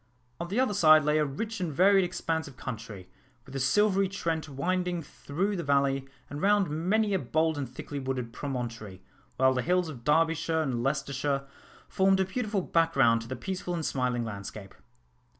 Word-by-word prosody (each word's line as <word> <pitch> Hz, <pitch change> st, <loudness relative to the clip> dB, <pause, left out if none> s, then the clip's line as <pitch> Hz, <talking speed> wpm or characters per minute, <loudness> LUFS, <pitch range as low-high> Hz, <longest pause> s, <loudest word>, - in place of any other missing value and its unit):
On 170 Hz, -, -4 dB
the 200 Hz, +7 st, -1 dB
other 260 Hz, -5 st, +2 dB
side 155 Hz, -5 st, +6 dB
lay 150 Hz, +1 st, +2 dB
a 150 Hz, -, +2 dB
rich 215 Hz, +11 st, -4 dB
and 175 Hz, -3 st, -2 dB
varied 190 Hz, +6 st, +5 dB
expanse 165 Hz, -2 st, -2 dB
of 135 Hz, -3 st, -13 dB
country, 110 Hz, -7 st, -7 dB, 0.4 s
with 135 Hz, -, -13 dB
the 135 Hz, -, -3 dB
silvery 195 Hz, +8 st, +3 dB
Trent 165 Hz, -5 st, -3 dB
winding 175 Hz, +4 st, -1 dB
through 180 Hz, +8 st, -3 dB
the 170 Hz, -, -3 dB
valley, 140 Hz, -1 st, +1 dB, 0.2 s
and 145 Hz, -, -7 dB
round 200 Hz, -3 st, +3 dB
many 200 Hz, +7 st, +1 dB
a 190 Hz, -, +2 dB
bold 155 Hz, +5 st, +1 dB
and 140 Hz, -4 st, -4 dB
thickly 140 Hz, +3 st, -6 dB
wooded 130 Hz, -3 st, -3 dB
promontory; 115 Hz, -8 st, -5 dB, 0.3 s
while 130 Hz, 0 st, +4 dB
the 125 Hz, -, 0 dB
hills 180 Hz, +3 st, +1 dB
of 125 Hz, -6 st, -9 dB
Derbyshire 160 Hz, +2 st, +2 dB
and 125 Hz, -5 st, -2 dB
Leicestershire 140 Hz, +1 st, -1 dB, 0.4 s
formed 190 Hz, 0 st, +3 dB
a 190 Hz, -, +3 dB
beautiful 205 Hz, -1 st, -2 dB
background 140 Hz, -10 st, +3 dB
to 115 Hz, -, -9 dB
the 130 Hz, -, -4 dB
peaceful 180 Hz, +5 st, -4 dB
and 165 Hz, -2 st, -3 dB
smiling 125 Hz, -2 st, -1 dB
landscape. 100 Hz, -2 st, -7 dB
150 Hz, 180 wpm, -28 LUFS, 130-180 Hz, 0.4 s, side